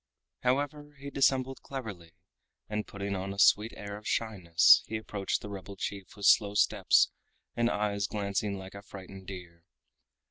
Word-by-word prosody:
However, 145 +3 -1
he 140 +1 -8
dissembled 135 -1 +1
cleverly, 105 -12 -8 0.5
and 105 0 -3
putting 100 0 -4
on 95 +1 -4
a - - -14
sweet 105 +3 +5
air 100 0 -6
of 105 - -10
shyness 90 -8 +4
he 110 - -3
approached 105 -2 -3
the 105 - -7
rebel 100 0 -8
chief 95 0 -6
with 100 - -4
slow 100 -1 +5
steps - - +4 0.4
and 120 0 +2
eyes 100 -2 -1
glancing 100 0 -2
like 95 0 -9
a 100 - -9
frightened 95 -1 -11
deer. 85 -3 -9
100 Hz, 155 wpm, -30 LUFS, 95-110 Hz, 0.5 s, sweet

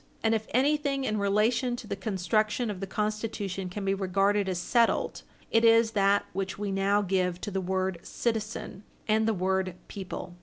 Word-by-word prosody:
And 225 0 +3
if 220 -1 -1
anything 280 +1 +1
in 215 -4 -1
relation 215 +5 +2
to 240 - -8
the 200 -1 -3
construction 215 +4 0
of 195 - -6
the 195 - -4
Constitution 210 -2 -3
can 195 +2 -5
be 195 - +2
regarded 195 +1 +1
as 185 - -1
settled, 230 +6 +1 0.3
it 225 0 +4
is 230 0 +5
that 200 -1 +3
which 190 +1 -3
we 205 -1 -3
now 200 +1 +2
give 180 -2 0
to 205 - -4
the 190 0 -1
word 185 -1 -1
"citizen" 220 -3 -3 0.3
and 220 0 +3
the 225 - +2
word 190 0 0
"people." 190 -2 -6
205 Hz, 180 wpm, -28 LUFS, 190-225 Hz, 0.3 s, is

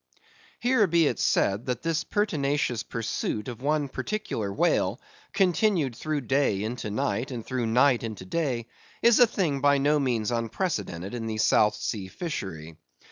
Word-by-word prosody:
Here 245 -4 +3
be 170 -1 +3
it - - 0
said, 100 +5 +1
that 125 -1 -2
this 165 -1 0
pertinacious 145 - 0
pursuit 110 -2 -3
of 120 -2 -7
one 150 +1 +1
particular 130 - -3
whale, 100 - +1 0.3
continued 180 - +2
through 155 +3 -2
day 130 -6 +1
into 110 0 -4
night, 110 +4 -1
and 120 -4 -6
through 125 -3 -2
night 125 +2 +4
into 110 -5 -6
day, 130 - -1 0.4
is 235 0 +6
a 245 - +8
thing 165 -10 -1
by 145 0 +4
no 145 +2 +2
means 125 -5 0
unprecedented 115 - -2
in 115 -2 -4
the 110 -1 -3
South 105 -1 +4
sea 100 -3 -4
fishery. 90 - -6
130 Hz, 155 wpm, -27 LUFS, 110-155 Hz, 0.4 s, a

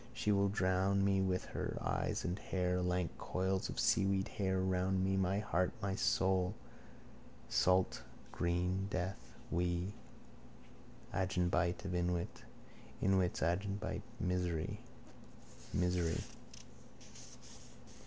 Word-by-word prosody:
She 105 - +1
will 100 0 +3
drown 95 0 +2
me 95 -1 +3
with 95 -1 0
her, - - -4
eyes - - -1
and 90 +3 -1
hair. 90 -1 0
Lank 90 -1 0
coils 95 +1 -1
of - - -4
seaweed 95 0 +2
hair 95 -3 0
around 95 0 +1
me, 95 0 +2
my 95 0 +2
heart, 90 -4 +1
my 95 0 -1
soul. 95 0 +2 0.9
Salt 90 0 +3 0.3
green 90 +2 0
death. 95 0 -4 0.2
We. 90 +3 0 1.2
Agenbite 90 -1 +1
of 95 - -2
inwit. 90 -1 -1 0.6
Inwit's 95 -2 +2
agenbite. 100 +4 -1 0.2
Misery! 90 -3 -1 0.9
Misery! 90 -2 +1
95 Hz, 105 wpm, -36 LUFS, 90-95 Hz, 1.2 s, will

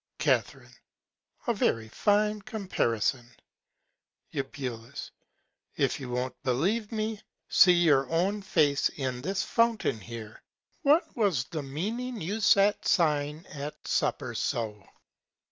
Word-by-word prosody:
Ca. - - +3 1.0
A 235 - +2
very 115 - 0
fine 210 - +1
Comparison. 130 - -1 1.0
Eu. 140 - -1 1.3
If - - 0
you 130 -3 -6
won't 125 +1 -3
believe 190 - 0
me, 215 -1 -2 0.3
see 180 - +7
your 155 -6 +3
own 190 +5 +1
Face 150 -7 +2
in 130 -3 -4
this 190 +6 -1
Fountain 230 - +1
here. 110 0 -9 0.4
What 305 +2 +3
was 200 - +2
the 155 +2 -5
Meaning 215 - -4
you 200 +6 -3
sat 205 0 +4
sighing 150 -2 +1
at 150 +1 -8
Supper 130 -4 0
so? 110 -3 -3
160 Hz, 110 wpm, -28 LUFS, 130-210 Hz, 1.3 s, see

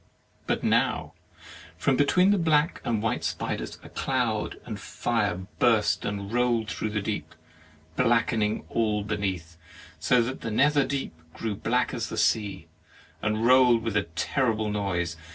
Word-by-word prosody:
'' - - -36
But - - 0
now, - - +1 0.6
from 135 - +2
between 180 +8 +4
the 205 - +3
black 155 -2 +2
and 110 -3 -1
white 110 - -1
spiders, - - -3
a - - -11
cloud - - -1
and - - -6
fire 105 -6 -1
burst 115 -3 +3
and 100 0 -4
rolled 120 -3 +1
through 110 - -3
the 105 -1 -2
deep, 105 0 -4 0.6
blackening 115 -3 +1
all 105 -2 0
beneath 95 -6 -3 0.4
so 125 -2 +3
that 130 +3 -5
the 115 - -3
nether 140 +4 +3
deep 140 -8 -3 0.2
grew 110 -2 -3
black 120 +5 0
as 115 - -3
a - - -4
sea, 100 -7 +1 0.6
and 110 +1 0
rolled 125 -2 +5
with 115 -2 -2
a 100 -3 +2
terrible 110 +1 0
noise. 90 -5 -2
110 Hz, 150 wpm, -27 LUFS, 105-125 Hz, 0.6 s, rolled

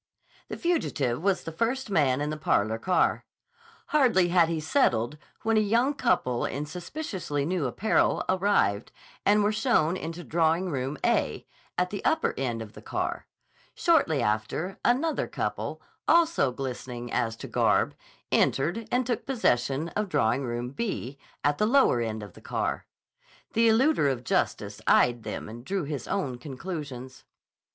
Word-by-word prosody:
The - - -6
fugitive 155 - 0
was 195 0 +1
the 165 - -5
first 235 +6 -1
man 145 -6 +2
in 150 +1 -1
the - - -2
parlor 110 -7 +1
car. 180 +9 +2 0.7
Hardly 240 -12 +4
had 170 -2 +4
he 165 -1 -1
settled 150 - +1 0.2
when 225 0 +2
a - - +6
young 230 +7 +2
couple 125 - +1
in 145 +2 -2
suspiciously 175 - -4
new 170 -4 0
apparel 210 - +1
arrived, 185 - +1 0.4
and 205 +1 +5
were 205 - +3
shown 215 - +2
into 170 -1 -6
Drawing 165 +3 +1
Room 135 +1 -2
"A," - - +1 0.3
at 180 0 +1
the 205 - -5
upper 320 - +2
end 120 -4 -2
of 110 0 -13
the - - -11
car. - - -3 0.5
Shortly 220 - +3
after, 110 - -2
another 280 +7 +1
couple, - - -3 0.3
also 330 - +4
glistening 125 -2 -6
as 115 -1 0
to - - -8
garb, - - +2 0.4
entered 175 +11 +1
and 250 0 +2
took 240 +1 -2
possession 150 - +1
of 210 +1 -2
Drawing 140 -3 +1
Room 120 0 -3
"B," 140 - -4 0.2
at 145 0 +1
the 210 - +3
lower 245 - +4
end 110 -2 -3
of 105 - -10
the - - -15
car. - - -2 0.7
The 230 +1 +4
eluder 230 - +3
of 125 -2 -4
justice - - -1
eyed 120 -1 +4
them 105 -1 -5
and 115 +2 -9
drew 190 +5 -2
his 140 -4 -5
own 140 -11 -2
conclusions. 130 -2 -7
160 Hz, 155 wpm, -27 LUFS, 125-215 Hz, 0.7 s, a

